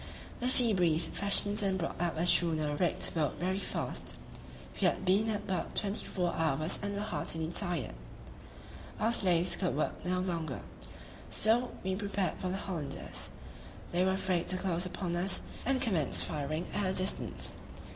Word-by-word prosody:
The 250 - +1
sea 245 -3 +7
breeze 165 -3 +3
freshened 205 +1 +2
and 195 -2 +1
brought 170 -1 -3
up 170 -2 0
a 165 - +1
schooner 160 -4 +3
rigged 175 +2 0
boat 155 -4 0
very 185 +2 0
fast. - - -4 0.7
We - - +6
had - - 0
been 200 +4 +3
at 210 -1 -2
work 185 - -2
twenty 200 0 -2
four 180 -2 -1
hours 155 +1 0
and 200 0 -3
were 200 - -2
heartily 160 -4 -2
tired; 175 - -1 1.1
our 225 +2 +2
slaves 180 -6 +4
could 180 -6 -1
work 155 - -1
no 180 +1 0
longer, 165 -7 -2 0.7
so 235 +3 +3
we 190 0 0
prepared 200 -1 -2
for 185 - -2
the 190 - -2
Hollanders; 165 -8 -5 0.6
they 175 +1 +2
were 190 0 +3
afraid 185 -2 0
to 185 - 0
close 180 -1 -1
upon 175 -1 -3
us 180 +2 0 0.3
and 270 -1 +3
commenced 190 - +2
firing 155 +3 -2
at 205 -2 +1
a - - 0
distance. 185 +1 0
185 Hz, 165 wpm, -32 LUFS, 165-200 Hz, 1.1 s, sea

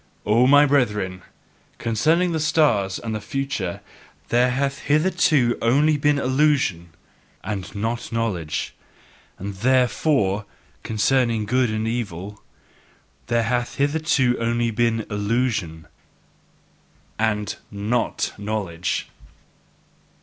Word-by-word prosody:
O 115 +4 +4
my 145 +2 +7
brethren, 105 -10 0 0.6
concerning 160 +11 +1
the 160 - -1
stars 145 - +2
and 115 -1 -5
the 110 - -3
future 125 -5 -3 0.5
there 125 +1 +3
hath 135 +2 -1
hitherto 155 -5 +2
been - - -10
only 145 +7 +4
illusion, 140 - +2 0.5
and 95 0 -5
not 115 +3 -3
knowledge; 100 -9 -2 0.6
and 100 +2 -5
THEREFORE 125 -3 +2 0.4
concerning 115 0 +1
good 125 +2 +1
and 110 +1 -2
evil 105 -4 -4 0.9
there 115 -1 +1
hath 120 +2 -1
hitherto 145 -3 +2
been 125 - -6
only 115 -1 0
illusion 105 -6 -1 1.3
and 105 -2 -1
not 110 +4 -1
knowledge! 95 -5 -3
115 Hz, 100 wpm, -22 LUFS, 105-135 Hz, 1.3 s, my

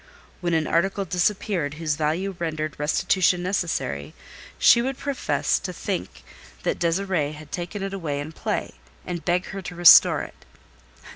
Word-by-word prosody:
When 175 -2 0
an 160 -1 +1
article 195 +5 0
disappeared 180 -3 -1
whose 155 -2 -1
value 165 +6 -1
rendered 155 -3 -3
restitution 175 +4 +2
necessary, 160 - -2 0.4
she 235 - +6
would 265 +2 -2
profess 280 -2 -1
to - - -5
think - - -5 0.4
that - - -1
Désirée 170 -3 0
had 150 -1 -13
taken 175 +6 -4
it 195 0 -4
away 155 -7 -3
in 145 +2 -6
play, - - -3 0.3
and 175 -2 -5
beg 180 +1 +1
her 195 - -5
to 180 -1 -8
restore 175 -1 +7
it. - - -12
175 Hz, 150 wpm, -24 LUFS, 155-190 Hz, 0.4 s, restore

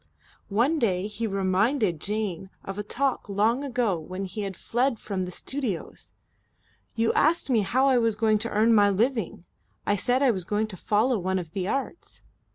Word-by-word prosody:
One 245 +10 +2
day 190 -6 +1
he 210 +2 -3
reminded 195 - +1
Jane 200 -3 -3
of 195 +1 -6
a - - 0
talk 255 +3 -2
long 220 +7 +1
ago 240 -9 0
when 185 +5 -5
he 210 +3 -5
had 195 -3 -5
fled 245 +1 0
from 195 -3 -3
the 180 - -7
studios: 245 -3 -5 0.8
"You 225 0 +2
asked 315 -2 +2
me 235 - +4
how 255 +7 +2
I 260 -2 +4
was 230 -2 +1
going 215 -1 +2
to 230 +2 -3
earn 220 +2 +3
my 205 -2 +5
living. 215 -3 -1 0.4
I 205 - +2
said 250 +7 +1
I 265 - +5
was 190 -5 -3
going 210 +4 0
to 195 - -7
follow 220 +6 +1
one 190 +1 -1
of 170 -4 -5
the 185 0 -3
Arts." 275 - -4
215 Hz, 185 wpm, -26 LUFS, 195-245 Hz, 0.8 s, my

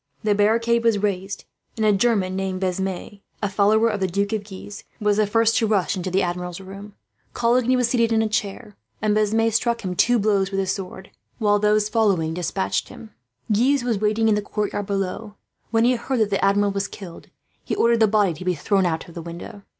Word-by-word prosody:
The 210 -1 +2
barricade 230 +3 +2
was 230 -2 +3
carried, 200 -1 -3 0.3
and 220 - 0
a 210 - +4
German 195 -3 +1
named 190 -1 -2
Besme, 190 +2 -3 0.2
a - - +2
follower 210 +3 +3
of 210 -3 -1
the 190 - 0
Duke 200 +4 -1
of 215 -2 -2
Guise, 200 0 -10 0.2
was 210 -1 +1
the 215 -1 +2
first 225 +2 +2
to 225 - +2
rush 205 -1 +1
into 185 0 -3
the 190 +2 +1
Admiral's 180 0 -4
room. 195 +2 -10 0.4
Coligny 245 +1 +2
was 250 -1 +2
calmly 235 -2 +3
seated - - -8
in 225 0 +3
a - - 0
chair, 210 0 -3 0.2
and 210 0 +1
Besme 220 +1 +2
struck 235 +1 +1
him 180 -1 -3
two 245 +6 +3
blows 200 -3 +1
with 195 -1 -2
his 190 -1 0
sword, 190 -1 -8 0.3
while 205 -2 +2
those 210 0 +2
following 200 -8 +1
despatched 100 - -2
him. 220 - -12 0.4
Guise 250 +5 +2
was 235 -4 -1
waiting 215 +2 +1
in 220 - +4
the 210 - +1
courtyard 205 -1 -3
below. 200 +2 -3 0.3
When 225 0 +2
he 245 +2 +4
heard 255 +2 -2
that 210 -1 +1
the 195 - 0
Admiral 200 +1 +3
was 200 0 -2
killed, 185 -5 -11 0.4
he - - -3
ordered 235 0 +3
the 220 - +5
body 205 -4 +2
to 165 - -9
be 180 -1 0
thrown 190 +4 +1
out 160 -1 -3
of 170 - -13
the 170 - -7
window. 170 +4 -9
205 Hz, 220 wpm, -22 LUFS, 190-225 Hz, 0.4 s, the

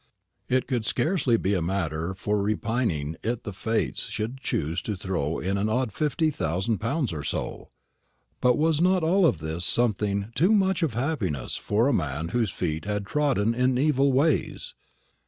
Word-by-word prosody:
It 130 0 +2
could 120 -3 -1
scarcely 140 - +1
be 100 -1 0
a 90 - +1
matter 85 -1 -2
for 105 +2 -1
repining 100 - -1
it 115 +1 -2
the 105 - -5
Fates 110 - -1
should 115 +5 -4
choose 85 - -2
to 105 - -3
throw 90 -5 -2
in 95 +2 -1
an 105 +2 0
odd 120 -1 0
fifty 155 +1 +1
thousand 95 - -1
pounds 125 - -1
or 75 - -4
so. - - -4 0.7
But 125 -1 +4
was 160 0 +2
not 185 0 +3
all 170 0 +4
this 80 +1 -4
something 105 -1 +1
too 180 - +3
much 190 -3 +2
of 150 -9 0
happiness 115 - -1
for 110 +5 +1
a 140 - +2
man 75 - -1
whose 115 +1 +1
feet 80 -2 -3
had 105 -1 -2
trodden 130 -5 +1
in 125 +1 +2
evil 140 0 +3
ways? 140 +2 +1
110 Hz, 170 wpm, -26 LUFS, 95-135 Hz, 0.7 s, But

